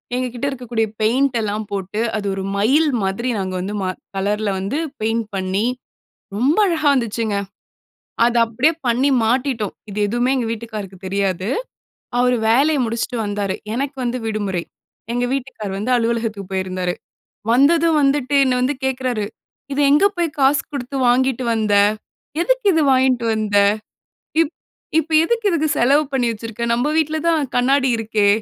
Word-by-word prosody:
எங்ககிட்ட 250 0 -3
இருக்கக்கூடிய 240 -4 -2
பெயிண்ட் 245 +3 +2
எல்லாம் 215 0 -2
போட்டு, 200 +2 -3 0.2
அது 205 - -3
ஒரு 195 0 -4
மயில் 280 +10 +3
மாதிரி 195 +6 -1
நாங்க 190 -1 -3
வந்து 200 +3 -4
ம - - -1 0.3
கலர்ல 205 +2 0
வந்து 200 +11 -2 0.2
பெயிண்ட் 225 0 0
பண்ணி, 190 +3 -1 0.7
ரொம்ப 270 - +2
அழகா 320 -3 -1
வந்துச்சுங்க. 225 -4 -1 0.9
அத 240 0 +2
அப்படியே 240 +8 +2
பண்ணி 245 +4 +2 0.2
மாட்டிட்டோம். 245 -3 0 0.2
இது 200 - -5
எதுவுமே 240 +4 0
எங்க 245 - -1
வீட்டுக்காருக்கு 215 -4 -7
தெரியாது. 190 -1 -1 0.7
அவரு 250 0 +3
வேலைய 280 +6 +3
முடிச்சுட்டு 230 +2 -2
வந்தாரு. 205 -2 -2 0.2
எனக்கு 275 +2 -3
வந்து 245 +1 -1
விடுமுறை. 205 -5 -2 0.5
எங்க 245 0 0
வீட்டுக்காரு 250 -7 -5
வந்து, 215 +5 -2
அலுவலகத்துக்கு 225 -4 -2
போயிருந்தாரு. 185 -1 -2 0.6
வந்ததும், 320 +5 +4
வந்துட்டு 275 -1 +1
என்னை 255 -1 +2
வந்து 260 +3 +1
கேக்குறாரு, 255 -4 -1 0.5
"இத 280 - -2
எங்க 300 +7 +5
போயி 345 -1 +1
காசு 275 +2 +4
குடுத்து 275 -1 -5
வாங்கிட்டு 255 +1 +2
வந்த? 215 -2 +1 0.7
எதுக்கு - - +1
இது 320 - +3
வாங்கிட்டு 255 -2 +3
வந்த? 215 -2 0 0.8
இப் 330 -1 +1 0.5
இப்ப 325 - -10
எதுக்கு 460 +2 0
இதுக்கு 315 -3 +1
செலவு 280 +5 +4
பண்ணி 255 -2 +1
வச்சிருக்க. 225 +1 -5
நம்ப 245 +5 0
வீட்டில 315 0 0
தான் 310 -6 +1
கண்ணாடி 265 +2 +3
இருக்கே?" 220 -2 +1
240 Hz, 145 wpm, -20 LUFS, 210-270 Hz, 0.9 s, எங்க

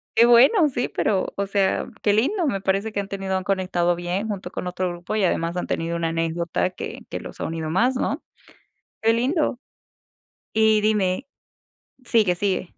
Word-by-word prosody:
qué 235 +1 +6
bueno, 275 - +6
sí, 245 -1 -1
pero, 195 -3 -1
o 200 0 -2
sea, 195 -1 +1 0.2
qué 205 - +3
lindo, 325 - +1
me 195 -9 -1
parece 195 +3 0
que 205 - -2
han 195 - -3
tenido 195 -1 -3
han 185 - -3
conectado 180 -3 +1
bien 175 +5 -2
junto 200 -2 -5
con 180 - -5
otro 180 0 -2
grupo 175 +4 -5
y 210 - +1
además, 170 0 0
han - - -1
tenido 165 +1 -2
una 165 -1 -1
anécdota 165 +2 -1
que 180 - -7
que - - -4
los - - -10
ha - - -2
unido 160 -1 -3
más, 245 +8 +2
¿no?, 285 +4 -1 0.8
qué 225 0 +4
lindo, 255 +2 0 1.0
y 220 -1 +4
dime 210 +3 +1 0.8
sigue, 215 -7 +3
sigue. 190 0 0
195 Hz, 185 wpm, -23 LUFS, 180-225 Hz, 1.0 s, qué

